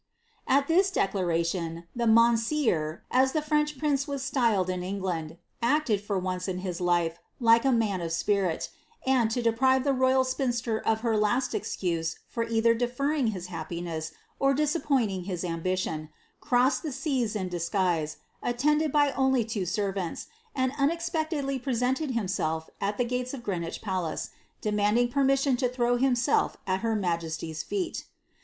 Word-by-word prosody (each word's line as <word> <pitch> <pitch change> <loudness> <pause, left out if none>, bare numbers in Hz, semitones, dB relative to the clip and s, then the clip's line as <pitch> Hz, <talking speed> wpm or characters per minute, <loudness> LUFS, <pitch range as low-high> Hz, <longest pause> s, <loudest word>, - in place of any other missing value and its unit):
At 275 +1 +3
this 370 +4 +4
declaration, 170 - -1
the 240 -1 0
mounseer^ 230 - +3
as 265 +1 +3
the 310 - +1
French 300 -1 +1
prince 280 0 0
was 280 -2 -3
styled 235 -9 +2
in 185 -1 -2
Eo^nd, 180 -4 -3 0.2
acted, 235 -4 +2
for 205 -1 -2
once 185 0 -2
in 185 -1 -2
his 180 -1 -4
life, 175 -1 +1 0.2
like 230 0 +5
a 270 - +4
man 215 -6 +1
of 165 -1 -3
spirit, 185 -1 0 0.4
and, 255 -4 +3
to 240 +2 -1
deprive 260 +3 +3
the 280 -1 +2
royal 260 0 +3
spinster 245 -4 -1
of 220 0 0
her 230 -2 +1
last 215 +5 +1
excuse 165 -3 -2
for 230 - -2
either 230 0 +3
deferring 250 +4 0
his 190 -5 -3
happiness 165 -1 -4 0.3
or 275 0 +3
disappointing 275 - 0
his 180 -3 -3
ambition, 165 -2 -2 0.3
crossed 255 +1 +2
the 310 - -4
seas 260 -5 -1
in 190 -3 -2
disguise, 175 -3 -1 0.2
attended 300 +5 +1
by 290 -1 +3
ooly 265 -4 +2
two 205 -5 -2
servants, 195 -2 -2 0.3
and 260 -1 +1
unexpectedly 315 -2 0
presenting 260 +2 0
himself 160 -7 -2
at 205 +1 -1
the 245 - +1
gates 250 +2 -2
of 245 - -9
Greenwich 170 -6 -3
palace, 185 -6 -2 0.3
demanded 210 +3 +2
permission 275 0 +3
to 250 0 +1
l^row 245 -1 +1
himself 245 -3 +2
at 190 0 0
ner 225 -1 +1
ma 180 -5 +1
jesty's 160 -1 -5
feet. 375 -4 -3
230 Hz, 155 wpm, -28 LUFS, 185-265 Hz, 0.4 s, like